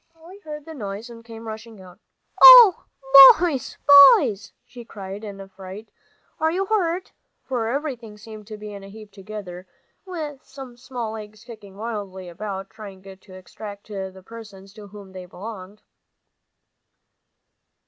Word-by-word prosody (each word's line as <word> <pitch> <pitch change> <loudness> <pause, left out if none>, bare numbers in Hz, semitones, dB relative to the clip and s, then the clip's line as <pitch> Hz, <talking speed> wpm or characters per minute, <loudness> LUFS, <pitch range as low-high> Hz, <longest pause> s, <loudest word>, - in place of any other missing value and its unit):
Polly 330 +4 -17
heard 300 -5 -10
the 320 - -10
noise 215 -2 -8
and 230 -1 -14
came 230 -1 -12
rushing 220 0 -10
out. 185 0 -16 0.4
"Oh, - - +9 0.5
boys 325 -7 -3 0.4
boys!" 205 0 -5
she 245 -1 -13
cried 200 -2 -10
in 200 -2 -9
a 195 - -11
fright, 195 +3 -12 0.5
"are 315 - 0
you 380 +3 -2
hurt?" 375 -4 -2 0.3
for 245 -4 -4
everything 245 -5 -6
seemed 215 -1 -13
to 215 -1 -9
be 210 0 -10
in 200 -1 -11
a 195 - -12
heap 210 0 -14
together, 195 -2 -11 0.4
with 310 -7 -8
some 265 -2 -13
small 245 -2 -7
legs 215 0 -11
kicking 210 -5 -14
wildly 200 -4 -7
about, 195 +2 -8
trying 195 -3 -13
to 195 -1 -14 0.2
extricate 200 0 -10
the 190 - -15
persons 200 -3 -14
to 210 -1 -13
whom 200 -1 -14
they 185 -1 -11
belonged. 200 +1 -11
215 Hz, 150 wpm, -21 LUFS, 195-245 Hz, 0.5 s, Oh